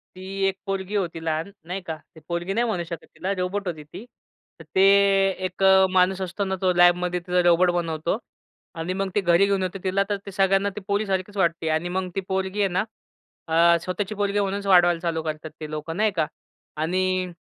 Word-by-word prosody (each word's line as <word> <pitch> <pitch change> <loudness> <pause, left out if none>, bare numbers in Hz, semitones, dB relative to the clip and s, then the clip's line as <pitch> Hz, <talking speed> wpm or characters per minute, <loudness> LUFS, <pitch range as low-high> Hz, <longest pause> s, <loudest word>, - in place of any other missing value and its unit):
ती 185 - -10 0.2
एक 195 0 -2
पोरगी 195 +1 -3
होती 175 -5 -1
लहान, 160 +3 -2
नाही 185 +2 -4
का. 160 -2 -5 0.2
ती - - -12
पोरगी 175 +2 -2
नाही 235 +2 +1
म्हणू 180 -6 -1
शकत 170 -2 -6
तिला 190 - -3
रोबोट 185 +2 -2
होती 155 -3 -4
ती. 180 +10 -11 0.5
तर - - -10
ते 190 - +4 0.6
एक 185 +1 -4
अ, 190 0 +6
माणूस 185 +1 +3
असतो 190 +2 -3
ना, 190 0 -1
तो 185 -1 +3
लॅबमध्ये 175 0 +3
तिचा 180 +1 +1
रोबोट 175 +1 +5
बनवतो. 170 +1 -1 0.6
आणि 165 +3 -3
मग 195 0 -2
ते 205 - +3
घरी 175 +2 +4
घेऊन 195 -1 +1
येतो 185 +1 -3
तिला 190 +1 +1
तर 205 - 0
ते 200 - -7
सगळ्यांना 195 +1 +2
ते 210 - -6
पोरीसारखीच 200 -1 -1
वाटते. 170 -3 +1
आणि 160 +3 0
मग 185 0 -2
ती 195 - 0
पोरगी 190 +1 -2
आहे 200 - +3
ना, 185 +2 0 0.6
अ, 170 +1 +5
स्वतःची 195 +3 -3
पोरगी 205 0 0
म्हणूनच 200 0 -2
वाढवायला 175 -2 +5
चालू 165 -2 -2
करतात 155 0 -5
ते 155 - -6
लोकं, 155 +2 -5
नाही 215 0 +2
का 150 - +1 0.5
आणि 185 +2 0
185 Hz, 205 wpm, -24 LUFS, 170-195 Hz, 0.6 s, अ